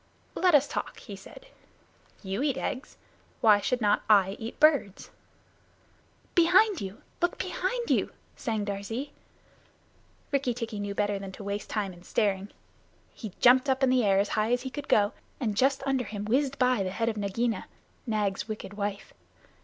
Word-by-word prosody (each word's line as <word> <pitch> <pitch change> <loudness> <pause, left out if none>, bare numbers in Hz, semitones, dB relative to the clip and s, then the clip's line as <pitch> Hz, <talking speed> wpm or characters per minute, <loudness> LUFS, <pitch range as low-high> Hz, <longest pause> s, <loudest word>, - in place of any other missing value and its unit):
"Let 360 -4 +4
us 290 0 +5
talk," - - -4
he - - -9
said. - - -13 0.8
"You 195 +4 -3
eat 280 -2 +1
eggs. 265 0 -4 0.4
Why 210 -2 +6
should 245 +4 -1
not 205 -1 +3
I 195 -3 +6
eat 225 +1 -7
birds?" 285 -11 +3 1.2
"Behind 365 +3 +5
you! 195 +1 -7 0.2
Look 345 0 +1
behind 380 +6 -2
you!" - - +2 0.2
sang 220 -3 -2
Darzee. 210 +8 -4 1.2
Rikki 270 -4 0
tikki 230 -3 -4
knew 205 0 -4
better 205 -1 0
than 195 -1 -7
to 200 - -9
waste 200 +1 -4
time 200 -4 -2
in 175 - -15
staring. 195 +1 0 0.6
He 215 -6 -8
jumped 255 +2 +6
up 265 +1 +1
in 260 - +4
the 255 -2 +3
air 195 -2 +3
as 200 +1 +2
high 215 +2 0
as 245 0 +1
he 260 - -5
could 290 0 -6
go, 205 +1 +3 0.3
and 220 -6 -1
just 270 +4 +2
under 265 -3 0
him 210 -1 -5
whizzed 270 +5 +1
by 250 -4 +3
the 185 - -1
head 225 +4 -2
of 225 - 0
Nagaina, 220 +3 -1 0.4
Nag's 210 -3 -1
wicked 215 -2 -6
wife. 205 -1 -4
225 Hz, 170 wpm, -28 LUFS, 205-265 Hz, 1.2 s, Why